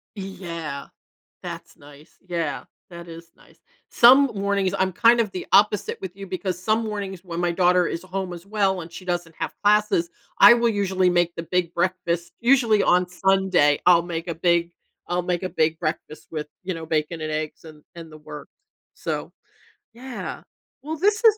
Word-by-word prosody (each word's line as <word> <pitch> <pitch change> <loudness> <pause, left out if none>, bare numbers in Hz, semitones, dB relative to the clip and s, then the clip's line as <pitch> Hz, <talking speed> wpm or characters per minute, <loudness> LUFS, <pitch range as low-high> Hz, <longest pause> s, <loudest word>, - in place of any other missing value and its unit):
Yeah, 170 -7 -6 0.5
that's - - -8
nice, 145 +2 -17
yeah, 165 -5 -3 0.3
that 170 0 -10
is 165 0 -11
nice. - - -22 0.3
Some 260 +4 +7
mornings 200 -1 0
I'm 190 0 +1
kind 235 +4 +5
of 215 -4 0
the 185 - -6
opposite 210 -1 +3
with 190 -1 -7
you 195 - -8
because 185 -1 -4
some 220 +3 +1
mornings 195 -4 -5
when 170 -2 -6
my 175 -1 +1
daughter 180 0 +3
is 170 - -4
home 185 -1 -4
as 170 +2 -10
well 195 -3 0
and 165 +1 -10
she 185 - -10
doesn't 175 -2 -3
have - - -4
classes, 205 -4 +3 0.3
I 235 - +10
will 235 -1 +2
usually 190 -3 +1
make 175 -1 +1
the 165 - -5
big 175 0 -1
breakfast. 175 -1 -1
Usually, 235 -4 +4
on 180 0 +3
Sunday, 185 -5 +2
I'll 175 -1 +6
make 170 0 -5
a 170 - -3
big 170 +1 +1 0.4
I'll 180 0 0
make 175 +1 -2
a 185 - -2
big 160 0 0
breakfast 155 -1 -5
with, 150 -2 -4 0.2
you 185 0 -3
know, 165 -1 -7
bacon 160 +1 -1
and 155 0 -3
eggs 155 +1 -4
and 155 -2 -13
and 165 -2 -10
the 155 - -11
works. 150 -1 -11 0.4
So, - - -5 0.6
yeah. 250 +1 -7 0.4
Well, 315 +2 -5
this 415 +7 +2
was 435 -1 +6
180 Hz, 180 wpm, -23 LUFS, 165-200 Hz, 0.6 s, I